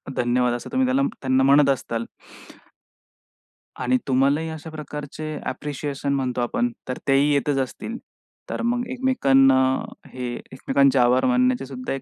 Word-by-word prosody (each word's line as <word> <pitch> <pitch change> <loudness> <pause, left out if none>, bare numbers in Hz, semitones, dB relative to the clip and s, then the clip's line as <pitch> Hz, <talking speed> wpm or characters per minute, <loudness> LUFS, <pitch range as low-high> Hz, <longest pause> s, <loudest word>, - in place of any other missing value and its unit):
धन्यवाद, 125 0 +1
असं 120 - -6
तुम्ही 260 +1 +2
त्याला 265 +2 +2 0.2
त्यांना 130 0 +2
म्हणत 140 +1 +5
असाल. 115 -3 -1 1.7
आणि 125 +1 +2
तुम्हालाही 140 +5 +2
अशा 160 0 -7
प्रकारचे 150 0 -7
अ‍ॅप्रिशिएशन 145 -1 -4
म्हणतो 130 -2 -1
आपण, 240 - 0 0.2
तर 125 - -3
तेही 140 +2 +4
येतच 140 0 +1
असतील. 225 - -4 0.5
तर - - -3
मग 245 +1 -1
एकमेकांना 135 - +4 0.6
हे 125 -1 -4
एकमेकांचे 135 0 +1
आभार 125 +1 +4
मानायचे, 255 - +2
सुद्धा 130 0 -5
एक 135 - -4
140 Hz, 135 wpm, -23 LUFS, 130-160 Hz, 1.7 s, म्हणत